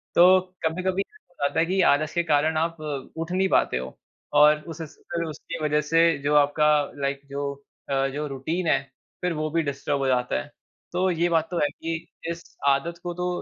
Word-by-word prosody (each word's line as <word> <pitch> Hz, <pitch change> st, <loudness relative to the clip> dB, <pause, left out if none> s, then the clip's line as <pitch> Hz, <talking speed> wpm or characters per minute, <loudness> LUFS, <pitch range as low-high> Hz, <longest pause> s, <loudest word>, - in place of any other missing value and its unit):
तो 185 Hz, +2 st, +8 dB, 0.3 s
कभी-कभी 185 Hz, +4 st, 0 dB
हो 425 Hz, -, -25 dB
जाता 140 Hz, -, -1 dB
है 165 Hz, -, +4 dB
कि 190 Hz, +2 st, +1 dB
आलस 155 Hz, +2 st, -1 dB
के 170 Hz, 0 st, +1 dB
कारण 155 Hz, 0 st, +2 dB
आप 165 Hz, 0 st, -1 dB
अ, 145 Hz, -3 st, -4 dB
उठ 165 Hz, +2 st, -4 dB
नहीं 190 Hz, +1 st, +2 dB
पाते -, -, +3 dB
हो, 65 Hz, +1 st, -6 dB, 0.4 s
और 150 Hz, +1 st, +7 dB
उस 165 Hz, 0 st, -7 dB
उस 155 Hz, -, -9 dB
अ, 170 Hz, -1 st, -4 dB
उसकी 155 Hz, +1 st, -7 dB
वजह 150 Hz, 0 st, +2 dB
से 165 Hz, +1 st, +3 dB
जो 150 Hz, +1 st, +2 dB
आपका 145 Hz, +1 st, +4 dB, 0.3 s
लाइक 140 Hz, 0 st, -1 dB
जो 140 Hz, 0 st, -2 dB, 0.4 s
अ, 135 Hz, 0 st, +2 dB
जो 145 Hz, +3 st, -3 dB
रूटीन 160 Hz, +6 st, -3 dB
है, 135 Hz, -3 st, +3 dB, 0.4 s
फिर 180 Hz, -1 st, 0 dB
वो 155 Hz, 0 st, -2 dB
भी 165 Hz, 0 st, +2 dB
डिस्टर्ब 140 Hz, 0 st, -2 dB
हो 135 Hz, -, 0 dB
जाता 125 Hz, -, +1 dB
है। -, -, -10 dB, 0.5 s
तो 185 Hz, +1 st, +2 dB
ये 170 Hz, +1 st, +1 dB
बात 165 Hz, -1 st, +2 dB
तो 175 Hz, -, -2 dB
है 145 Hz, -, +3 dB
कि 165 Hz, 0 st, -5 dB, 0.4 s
इस 170 Hz, 0 st, -4 dB, 0.3 s
आदत 140 Hz, +5 st, +2 dB
को 175 Hz, -1 st, -3 dB
तो 180 Hz, +1 st, -2 dB
155 Hz, 210 wpm, -25 LUFS, 145-170 Hz, 0.5 s, तो